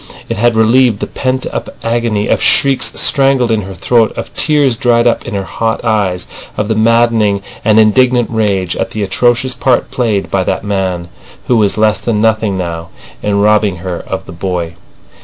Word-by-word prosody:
It - - -2
had 120 +1 +2
relieved 115 0 +3
the - - -2
pent 130 0 -3
up - - -4
agony 115 -3 -1
of - - +1
shrieks 135 -1 +3
strangled 135 -4 +2
in 110 -1 +1
her 95 -1 -8
throat, 115 +4 +2
of - - -6
tears 145 -5 +2
dried 120 0 +2
up 120 - 0
in - - -4
her 100 - -2
hot 115 +4 -3
eyes, 100 -5 0 0.3
of 105 +1 -2
the 110 - +1
maddening 110 -3 +2 0.2
and 110 0 +4
indignant 120 +2 +3
rage 100 -5 0
at - - -2
the 110 - -4
atrocious 120 +6 +1
part 125 0 0
played 110 -6 -1
by 95 -1 +1
that - - -2
man, 95 -4 -2 0.4
who 125 - +2
was 105 -3 +1
less 110 0 +2
than 115 -3 -1
nothing 110 -2 +1
now, 85 -2 -4 0.3
in 100 -1 0
robbing 105 -2 +2
her 90 0 -5
of - - -4
the - - -10
boy. 85 -1 -4
110 Hz, 185 wpm, -13 LUFS, 100-120 Hz, 0.4 s, and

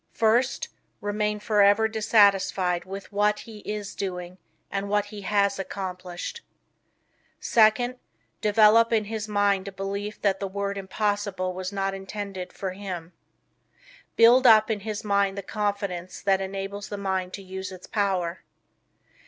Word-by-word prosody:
First, 235 +4 +2 0.3
remain 210 +1 -1
forever 205 0 +4
dissatisfied 200 -5 +3
with 195 +2 -8
what 210 +1 +2
he 220 -2 -11
IS 210 -1 -5
doing 180 -1 -5 0.3
and 200 0 -2
with - - -6
what 205 0 +2
he 205 0 -9
HAS 200 0 +1
accomplished. 185 - -5 1.0
Second, 245 +3 +3 0.4
develop 215 +2 +5
in 220 -2 +3
his 215 0 -4
mind 205 -2 +1
a - - -4
belief 200 +2 -4
that 195 -2 +2
the 195 - -2
word 200 +1 -3
impossible 195 -1 -2
was 185 +1 -4
not 195 -1 -1
intended 195 -1 -6
or 190 - 0
him. 185 -3 -7 1.0
Build 245 +3 +7
up 220 -1 +7
in 215 - -1
his 210 +1 -5
mind 200 -1 +1
the 200 - -4
confidence 200 -3 -3
that 195 -1 +2
enables 195 +1 -5
the 205 - -4
mind 190 -2 -2
to 195 - -7
use 190 0 -6
its 185 -1 -10
power. 185 -4 -1
200 Hz, 145 wpm, -26 LUFS, 190-210 Hz, 1.0 s, Build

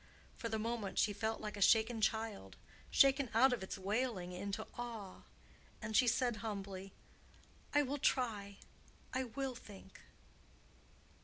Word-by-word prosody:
For 230 - -4
the 220 - 0
moment 225 -2 -3
she 210 - +3
felt 220 +2 -2
like 210 -1 -4
a 205 - -7
shaken 225 +2 +4
child—shaken 225 +5 +1
out 255 +3 +6
of 245 - -2
its 190 - -5
wailing 200 -2 -1
into 200 +4 -4
awe, 230 -6 -6 0.6
and 215 0 -4
she 250 - +6
said 240 0 +2
humbly, 195 -2 -5 0.8
"I 290 0 +4
will 285 +1 -2
try. 210 -7 0 0.6
I 260 0 0
will 265 +2 -3
think." 200 -5 -12
220 Hz, 135 wpm, -37 LUFS, 200-245 Hz, 0.8 s, out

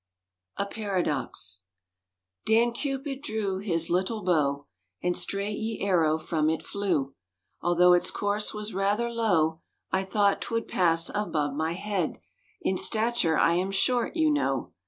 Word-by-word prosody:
A 200 - 0
PARADOX 165 - -3 0.9
Dan 230 +2 +4
Cupyd 275 +1 -3
drewe 200 -6 -2
hys 165 -5 0
lyttle 190 +5 -1
bowe, 145 -5 +1 0.4
And 180 0 +2
strayght 200 +4 -2
ye 220 0 -3
arrowe 165 -5 +2
from 155 -1 0
it 160 - -1
flewe, 170 -10 -1 0.5
Although 175 +1 +5
its 175 - +2
course 205 +1 -1
was 210 0 -6
rather 205 +5 0
lowe, 165 -9 +1 0.3
I 190 0 +1
thought 200 +1 +2
'twould 230 -1 -2
pass 165 -2 +2
above 155 -9 -1
my 160 +3 -1
heade— 195 -2 -2 0.4
In 190 - +1
stature 220 -7 +3
I 170 - +4
am 180 +3 0
shorte, 240 - +1
you 315 -2 +3
knowe. 135 - -1
190 Hz, 140 wpm, -27 LUFS, 165-215 Hz, 0.9 s, Although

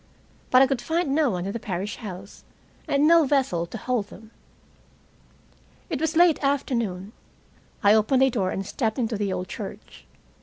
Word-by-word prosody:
But 255 +1 +6
I - - +6
could 265 -2 -2
find 325 +1 -1
no 300 -2 +3
one 180 -4 -3
in 200 - -3
the 235 - -4
parish 195 +1 -4
house, 195 -3 -9 0.4
and 285 +2 +3
no 335 0 +6
vessel 260 -12 0
to 225 - -7
hold 230 -2 -2
them. 220 +1 -14 1.6
It 300 -2 -2
was 320 +1 -1
late 340 -3 +4
afternoon. 235 -9 -1 0.7
I 205 +1 +6
opened 220 +5 +3
a 265 - +3
door 195 -6 -1
and 195 +1 -4
stepped 220 +1 -2
into 235 -3 -1
the 205 -2 -2
old 185 0 -3
church. - - -9
235 Hz, 175 wpm, -24 LUFS, 200-280 Hz, 1.6 s, But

